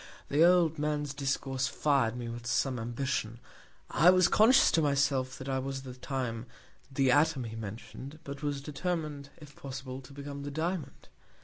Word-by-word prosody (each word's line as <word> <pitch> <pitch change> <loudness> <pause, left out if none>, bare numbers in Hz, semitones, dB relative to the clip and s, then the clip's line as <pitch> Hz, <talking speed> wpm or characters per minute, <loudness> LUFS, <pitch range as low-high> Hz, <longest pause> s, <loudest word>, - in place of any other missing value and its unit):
The 150 +3 +4
old 170 -3 +4
Man's 150 -1 -1
Discourse 135 -1 -1
fir'd 135 -7 +1
me 120 -1 -5
with 120 0 -6
some 130 +1 +1
Ambition; 120 -1 -2 0.5
I 170 - +6
was 185 -1 +6
conscious 225 +8 +6
to 165 - +3
myself 140 -3 +1
that 130 - -8
I 135 -1 0
was 135 +1 -3
at - - -12
that 125 -1 -10
Time 125 -4 -3 0.4
the 135 -1 +3
Atom 145 -1 +3
he 115 -1 -6
mention'd, 115 +6 -8
but 140 0 -7
was 145 -2 -2
determin'd, 150 -2 -3
if 150 -2 -14
possible, 130 -1 -7
to 130 - -14
become 140 0 -7
the 145 - -5
Diamond. 160 +3 -4
140 Hz, 175 wpm, -30 LUFS, 130-150 Hz, 0.5 s, I